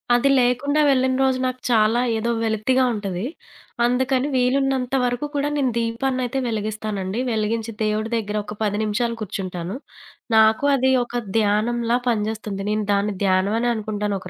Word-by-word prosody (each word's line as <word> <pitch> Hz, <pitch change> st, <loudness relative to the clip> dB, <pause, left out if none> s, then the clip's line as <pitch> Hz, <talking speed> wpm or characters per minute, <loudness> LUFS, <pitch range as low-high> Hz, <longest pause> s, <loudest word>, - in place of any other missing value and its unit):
అది 250 Hz, +3 st, +3 dB
లేకుండా 255 Hz, +5 st, +2 dB
వెళ్ళిన 260 Hz, -1 st, +2 dB
రోజు 260 Hz, -1 st, +2 dB
నాకు 255 Hz, 0 st, -2 dB
చాలా, 225 Hz, +1 st, +3 dB, 0.2 s
ఏదో 225 Hz, +2 st, -1 dB
వెలతిగా 225 Hz, +4 st, +1 dB
ఉంటది. 200 Hz, -2 st, -3 dB, 0.6 s
అందుకని 260 Hz, +2 st, +1 dB
వీలున్నంత 260 Hz, 0 st, +1 dB
వరకు 245 Hz, +3 st, -1 dB
కూడా 285 Hz, +1 st, 0 dB
నేను 265 Hz, -3 st, +1 dB
దీపాన్నైతే 255 Hz, +2 st, -1 dB
వెలిగిస్తానండి. 215 Hz, -2 st, -3 dB
వెలిగించి 220 Hz, +1 st, -1 dB
దేవుడి 215 Hz, +1 st, -1 dB
దెగ్గర 210 Hz, -1 st, -3 dB
ఒక 210 Hz, +1 st, -7 dB
10 205 Hz, 0 st, 0 dB
నిమిషాలు 230 Hz, +2 st, -1 dB
కూర్చుంటాను. 185 Hz, -2 st, -4 dB, 0.6 s
నాకు 220 Hz, +4 st, +4 dB
అది 260 Hz, 0 st, +2 dB
ఒక 240 Hz, -, -17 dB, 0.3 s
ధ్యానంలా 230 Hz, +3 st, +1 dB
పనిజేస్తుంది. 210 Hz, -2 st, -2 dB
నేను 215 Hz, -1 st, 0 dB
దాన్ని 200 Hz, 0 st, 0 dB
ధ్యానం 190 Hz, +2 st, +2 dB
అనే 240 Hz, -, +1 dB
అనుకుంటాను 210 Hz, -2 st, -2 dB
ఒక 185 Hz, -, -9 dB
225 Hz, 145 wpm, -22 LUFS, 210-250 Hz, 0.6 s, నాకు